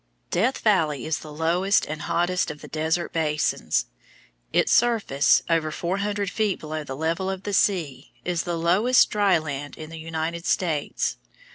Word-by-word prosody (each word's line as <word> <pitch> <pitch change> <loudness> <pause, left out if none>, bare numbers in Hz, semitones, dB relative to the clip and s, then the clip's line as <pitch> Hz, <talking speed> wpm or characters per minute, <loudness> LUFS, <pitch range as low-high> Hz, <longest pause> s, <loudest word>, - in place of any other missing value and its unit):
Death 235 +9 +1
Valley 160 - +2
is 160 -1 -1
the 155 - -10
lowest 175 +6 +2
and 155 0 -5
hottest 175 +4 0
of 150 0 -8
the - - -9
desert 160 +2 -1
basins. 150 - 0 0.7
Its - - +2
surface, 225 -12 +3
over 165 -2 +1
four 170 +4 -2
hundred 200 -1 -2
feet 215 -3 0
below 155 0 -5
the 135 -2 -6
level 165 +5 -1
of 190 0 -4
the 205 - -4
sea, 160 -9 0
is 175 -2 0
the 175 -1 -3
lowest 195 +10 +4
dry 205 -4 +3
land 145 -2 -5
in 155 0 -8
the 165 - -8
United 165 +1 -4
States. 160 -6 0
165 Hz, 165 wpm, -24 LUFS, 155-190 Hz, 0.7 s, lowest